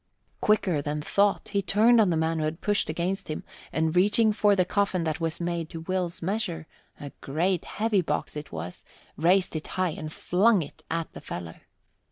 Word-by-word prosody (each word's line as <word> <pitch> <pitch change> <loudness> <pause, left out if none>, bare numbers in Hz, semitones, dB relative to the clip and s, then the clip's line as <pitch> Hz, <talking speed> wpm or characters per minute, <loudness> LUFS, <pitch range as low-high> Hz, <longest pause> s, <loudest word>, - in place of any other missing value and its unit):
Quicker 190 -7 +2
than 150 +1 -2
thought, 200 +6 +1
he 200 -1 +1
turned 220 +4 +5
on 205 - +3
the 165 - +1
man 160 0 0
who 155 - 0
had 155 +2 -3
pushed 205 -5 0
against 175 +5 -2
him, 155 - -4 0.3
and 160 +1 0
reaching 210 +4 +4
for 205 -1 +4
the 185 -2 +2
coffin 195 -2 0
that 160 0 -2
was 165 -1 -1
made 170 -2 -2
to 165 -2 -7
Will's 180 0 -2
measure 180 -4 -2 0.3
a 145 -2 -7
great, 170 +6 0
heavy 215 -2 +1
box 165 - -2
it 150 0 -7
was! 85 +2 -6 0.3
raised 180 +3 +2
it 155 - -4
high 185 -1 +2
and 155 0 -6
flung 195 +4 +3
it 145 - -13
at 165 0 -3
the - - -9
fellow. 85 -1 -7
175 Hz, 195 wpm, -27 LUFS, 160-200 Hz, 0.3 s, turned